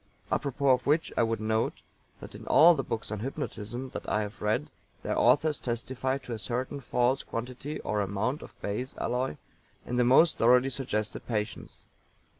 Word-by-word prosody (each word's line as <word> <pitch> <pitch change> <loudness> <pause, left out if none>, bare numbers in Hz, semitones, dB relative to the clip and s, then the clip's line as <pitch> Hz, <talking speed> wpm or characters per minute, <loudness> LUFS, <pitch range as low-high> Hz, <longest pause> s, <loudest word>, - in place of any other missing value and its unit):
Apropos 140 0 0
of 125 - +2
which 155 +3 +2
I - - +3
would 115 0 +1
note 110 +1 -1 0.4
that - - -9
in - - -10
all 170 +3 +8
the 145 - -1
books 115 -2 -4
on 105 - -3
Hypnotism 125 -1 -5
that - - -5
I 105 - +1
have 105 +1 -8
read 105 -8 0 0.3
their - - -1
authors 145 +5 +3
testify 130 +2 -2
to 125 -3 -7
a 110 - -4
certain 130 +5 -3
false 125 0 +1
quantity 125 +5 -5
or 105 -1 -1
amount 100 +8 -1
of - - -13
base 115 +6 -3
alloy 125 -8 -1 0.5
in 125 - -2
the 125 - +4
most 135 +7 +5
thoroughly 125 +3 +5
suggested 110 -5 -3
patients. 105 -2 -4
125 Hz, 175 wpm, -29 LUFS, 110-135 Hz, 0.5 s, all